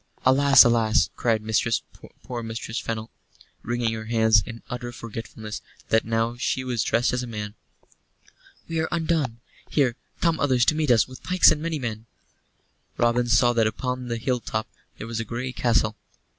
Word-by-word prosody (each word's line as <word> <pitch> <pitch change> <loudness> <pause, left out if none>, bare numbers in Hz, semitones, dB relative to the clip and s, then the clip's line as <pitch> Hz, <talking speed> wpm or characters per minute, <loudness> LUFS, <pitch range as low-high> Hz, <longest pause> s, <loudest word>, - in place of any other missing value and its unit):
"Alas, 140 +2 +7
alas!" 110 -6 +3
cried 115 -3 0 0.8
poor 120 -2 -5
Mistress 115 0 -4
Fennel, 110 -1 -5 0.5
wringing 120 -1 -1
her 110 -1 -5
hands 110 -2 +4
in 115 +1 -9
utter 120 0 -5
forgetfulness 115 -2 -7 0.3
that 110 - +3
now 115 +1 0
she 130 +1 -1
was 125 -3 -1
dressed 120 +3 +1
as 125 - 0
a 125 - -5
man. 105 -2 -5 1.1
"We 165 -1 -2
are 160 - 0
undone! 160 -8 -1 0.3
Here 130 -6 +2 0.2
come 165 -2 +1
others 130 -3 +3
to - - +4
meet 155 -2 0
us, 120 -2 +4
with 130 -1 -12
pikes 185 0 +5
and 150 - -1
many 165 -1 -2
men!" 115 -4 -5 0.9
Robin 120 +1 +2
saw 120 +1 +4
that 115 -2 +3
upon 125 +3 -3
the 115 -1 -2
hill 125 +2 -1
top 110 -1 -3 0.3
there - - -7
was 115 0 -4
a - - -1
grey 120 +4 -4
castle. 115 -3 +1
120 Hz, 170 wpm, -24 LUFS, 115-130 Hz, 1.1 s, Alas